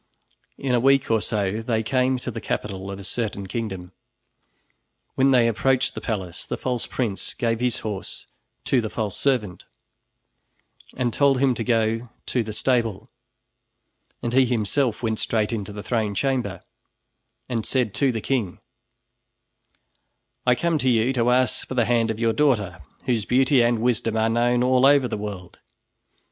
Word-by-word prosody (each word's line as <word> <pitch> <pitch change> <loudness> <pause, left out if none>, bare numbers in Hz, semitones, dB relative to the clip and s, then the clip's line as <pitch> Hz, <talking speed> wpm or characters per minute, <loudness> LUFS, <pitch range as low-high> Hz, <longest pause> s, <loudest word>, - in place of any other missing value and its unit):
In 135 -2 -1
a 120 - +4
week 135 0 +3
or 110 -1 +3
so 105 -1 -1
they 110 -1 -1
came 130 +2 +1
to 125 - -5
the 115 - -6
capital 100 -2 -4
of 100 - -5
a 100 - -9
certain 100 0 -3
kingdom. 95 -4 -5 1.2
When 135 +1 +3
they 125 -3 +5
approached 130 +3 +1
the - - -6
palace, 95 -6 -4
the - - -4
false 125 -2 -2
prince 110 -7 -3
gave 115 -3 0
his 125 -2 0
horse 105 -3 -5 0.4
to 130 - +2
the 110 - -4
false 105 -3 -3
servant 115 -10 -1 1.3
and 125 -3 0
told 140 +1 +3
him 135 -1 +3
to 115 - -3
go 115 0 0 0.2
to 125 - 0
the 110 -1 -5
stable, 115 -2 0 1.1
and 120 0 -2
he 130 0 +5
himself 120 +1 0
went 110 -1 -1
straight 110 0 0
into 105 -3 -4
the 105 0 -7
throne 110 -4 -1
chamber 125 -7 -1 0.8
and 115 -3 -2
said 125 -5 0
to 140 -2 +2
the 115 -2 -3
king: 115 -9 -2 1.9
"I 125 - +5
come 165 +4 0
to 130 -1 +1
you 120 +2 +2
to 120 -2 +2
ask 125 0 +1
for 130 - -5
the 120 -2 +3
hand 115 -1 +2
of 110 -1 -3
your 115 -1 +2
daughter, 105 - +1 0.2
whose 115 -5 0
beauty 130 +1 +3
and 120 0 +3
wisdom 115 -1 0
are 110 0 +2
known 120 +1 +2
all 130 +1 +4
over 140 -2 +5
the - - -3
world. 100 -4 -7
115 Hz, 165 wpm, -23 LUFS, 105-125 Hz, 1.9 s, they